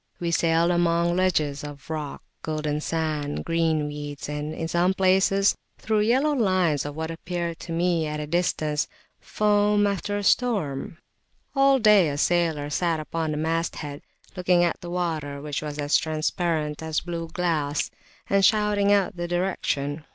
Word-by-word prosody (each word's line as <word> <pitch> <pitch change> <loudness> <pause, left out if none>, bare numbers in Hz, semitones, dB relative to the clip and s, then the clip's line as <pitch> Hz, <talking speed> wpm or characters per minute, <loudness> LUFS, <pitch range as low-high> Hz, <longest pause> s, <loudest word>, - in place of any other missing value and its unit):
We 170 -1 -1
sailed 165 +1 +3
among 170 0 +2
ledges 155 -6 +1
of 145 -2 -9
rock, 155 -3 -5 0.2
golden 155 -1 -2
sands, 155 -3 -2
green 165 -2 +1
weeds, 145 -1 -6
and 150 +1 -4
in 165 +1 -4
some 175 +3 +2
places 195 +1 +3 0.2
through 220 -1 0
yellow 260 +8 +3
lines 185 - +1
of 145 - -7
what 160 +1 -3
appeared 170 0 -4
to 170 - -8
me 170 -1 +1
at 150 0 -3
a 150 - -3
distance 155 -2 0 0.3
foam 205 0 +2
after 205 +1 -1
a 205 - -3
storm. 190 - 0 0.6
All 275 0 +5
day 210 - +5
a 140 - -3
sailor 160 -3 +1
sat 165 +1 0
upon 160 +1 -3
the 150 - -2
masthead, 160 -2 -2 0.3
looking 180 -1 +3
at 170 - 0
the 175 - -7
water, 160 -5 -2
which 145 0 -4
was 150 -1 -5 0.2
transparent 155 -1 -1
as 160 -1 -1
blue 170 -1 -5
glass, 160 -4 -1 0.4
and 195 0 +2
shouting 210 -1 +3
out 200 -3 +2
the 175 0 -3
direction. 165 -5 -1
165 Hz, 155 wpm, -25 LUFS, 150-185 Hz, 0.6 s, All